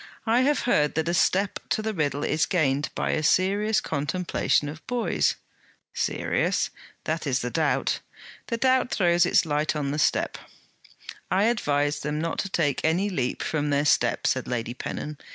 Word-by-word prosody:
'I 235 +2 +3
have 285 +3 +2
heard 150 - +2
that 160 +1 0
a 170 - 0
step 190 +3 +1
to 215 - 0
the 220 0 -2
riddle 145 -4 -1
is 155 +1 +1
gained 145 -6 +1
by - - -1
a 155 - 0
serious 200 +7 +2
contemplation 150 0 0
of 155 +2 -8
boys.' 245 -1 +1 0.6
'Serious?' - - 0 0.3
'That - - -2
is - - +1
the - - -3
doubt.' - - 0 0.5
'The 230 - -2
doubt 260 +1 +2
throws 175 -4 +3
its - - +3
light 150 0 0
on 140 -2 -2
the 150 - -2
step!' - - +1 0.9
'I 190 +2 +2
advise 145 -10 +1
them 150 +1 -3
not 165 +1 -2
to 195 - -2
take 155 -6 0
any 180 +6 +1
leap 130 -8 -2
from 150 -2 -1
their 145 0 +1
step,' - - +2
said - - 0
Lady 120 -1 -3
Pennon. 150 +3 -6
160 Hz, 170 wpm, -25 LUFS, 145-200 Hz, 0.9 s, I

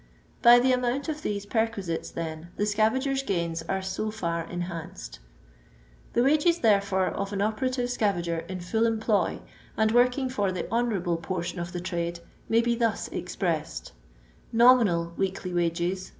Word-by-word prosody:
By 240 0 +9
the 255 +1 +3
amooBt 250 +4 0
of 305 -1 -3
these 205 -6 -3
perquisites, 205 -6 -1
then, 160 0 -6
the - - 0
scavagers' 230 +6 +1
gaini 170 -8 -2
an 190 0 -1
so 190 +3 -2
far 170 -6 -2
enhanced. 165 - -6 0.9
The 240 - +3
wages, 310 +5 +3
therefore, 200 -4 +3
of 200 0 -4
an 200 - -2
operative 245 +4 -1
scavager 175 -8 -1
in 185 -1 -5
full 220 +6 +1
employ, 220 -4 0 0.4
and 220 0 +2
workbg 250 +2 +3
for 205 -6 0
the 180 -2 -3
" - - -8
honouEable" 195 -8 0
portion 175 0 -3
of 170 0 -4
the 175 - -4
trade, 170 -1 -3 0.3
may 230 +1 +4
he 235 0 +1
thus 230 -2 0
expressed: - - -3 0.3
— - - -30
Nominal 200 -10 +5
weekly 190 -1 -2
wages 175 +2 -1
200 Hz, 155 wpm, -27 LUFS, 175-235 Hz, 0.9 s, By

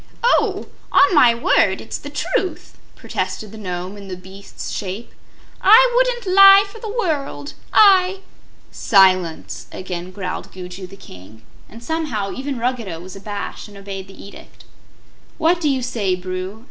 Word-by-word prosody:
"Oh, 485 - +2 0.3
on 380 0 +5
my 245 -7 +6
word, 195 -4 +2
it's - - -6
the 285 - -9
truth!" 375 +7 -3 0.2
protested 215 -2 -5
the 220 - -11
Nome 180 0 -5
in 200 -1 -11
the 185 -1 -6
beast's 190 +2 -10
shape. 200 +4 -6 0.5
"I 480 +5 +7
wouldn't 485 -6 +1
lie 390 0 +9
for 450 +3 -13
the 440 - -6
world; 315 - -3 0.2
I 385 -2 +5 0.2
" - - -32 0.2
"Silence!" 185 -5 +3
again 180 -1 -6
growled 185 -1 -6
Gugu 185 0 -9
the 195 - -13
King; 105 - -14 0.3
and 230 +2 -13
somehow, 250 -11 -3
even 270 0 -4
Ruggedo 230 -8 -3
was 185 +2 -10
abashed 200 +2 -6
and 205 -1 -14
obeyed 195 -1 -8
the 195 - -15
edict. 200 - -14 0.7
"What 335 +2 +2
do 305 - +1
you 265 -2 -1
say, 215 -7 -1
Bru?" 185 +3 -6
215 Hz, 155 wpm, -20 LUFS, -, 0.7 s, lie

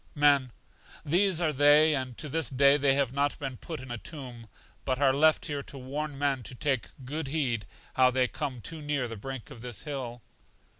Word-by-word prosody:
Men. 140 -4 +4 0.5
These 180 +3 +3
are 155 -3 +1
they, 145 +3 +6
and 130 -4 -3
to 155 - -3
this 160 +3 -1
day 140 +1 +5
they 140 -2 +3
have 135 -3 +1
not 140 +1 0
been 135 -3 -5
put 160 +3 -7
in 130 -1 -9
a 120 - -4
tomb, 125 -7 -8 0.4
but 130 - 0
are 135 -2 +4
left 155 +3 +4
here 145 -2 -2
to 140 - -9
warn 140 +3 -4
men 140 -2 0
to 125 - -7
take 130 -1 -1 0.2
good 150 +3 -4
heed 130 -8 -1 0.3
how 130 -1 +5
they 125 0 +2
come 130 -3 -4
too 160 +7 -6
near 145 -4 -1
the 115 - -6
brink 130 +5 -7
of 120 -4 -10
this 120 -2 -5
hill. 130 -5 -5
140 Hz, 205 wpm, -29 LUFS, 125-150 Hz, 0.5 s, they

